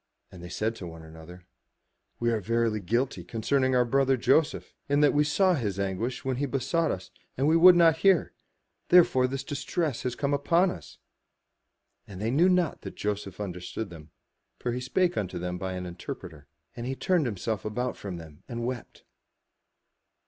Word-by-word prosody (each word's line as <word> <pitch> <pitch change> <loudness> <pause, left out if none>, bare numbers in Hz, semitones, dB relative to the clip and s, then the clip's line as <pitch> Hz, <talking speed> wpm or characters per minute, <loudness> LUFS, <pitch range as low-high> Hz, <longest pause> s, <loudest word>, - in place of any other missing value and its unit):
And 90 - -11
they 90 - -8
said 110 +5 -2
one 80 -2 -8
to 80 - -13
another, 80 +3 -13 0.7
"We 120 0 +1
are 110 -2 0
verily 115 +1 0
guilty 115 0 -1
concerning 130 +7 0
our 125 -1 +4
brother, 135 +2 +2
Joseph, 155 +5 +1 0.2
in 145 +1 +3
that 145 - +5
we 150 - +4
saw 185 +6 +3
his 105 - -2
anguish 100 +8 -2
when 130 -2 -1
he 140 +2 -1
besought 140 +6 0
us, 95 - -5 0.3
and 135 +3 +2
we 160 - +4
would 175 +2 +8
not 165 -2 +5
hear; 190 -1 +3 0.6
therefore 165 -8 +6
is - - -1
this 135 +1 -4
distress 140 -3 -2
come 140 +2 -1
upon 170 +6 +3
us." 80 -5 -10 1.1
And 95 -2 -9
they 110 +3 -1
knew 165 +8 +4
not 180 -4 +1
that - - -8
Joseph 105 -2 -4
understood 90 +1 -5
them; 80 -2 -12 0.5
for 120 - -3
he 125 +1 -3
spoke 180 +7 +1
unto 95 -4 -2
them 90 +1 -4
by 95 0 -3
an 90 0 -5
interpreter. 85 -3 -8 0.3
And 120 0 -5
he 135 - -2
turned 170 +2 +1
himself 110 0 -3
about 125 +4 -2
from 95 -4 -6
them 80 -3 -12
and 120 0 -4
wept. 125 -1 -6
120 Hz, 180 wpm, -28 LUFS, 95-145 Hz, 1.1 s, would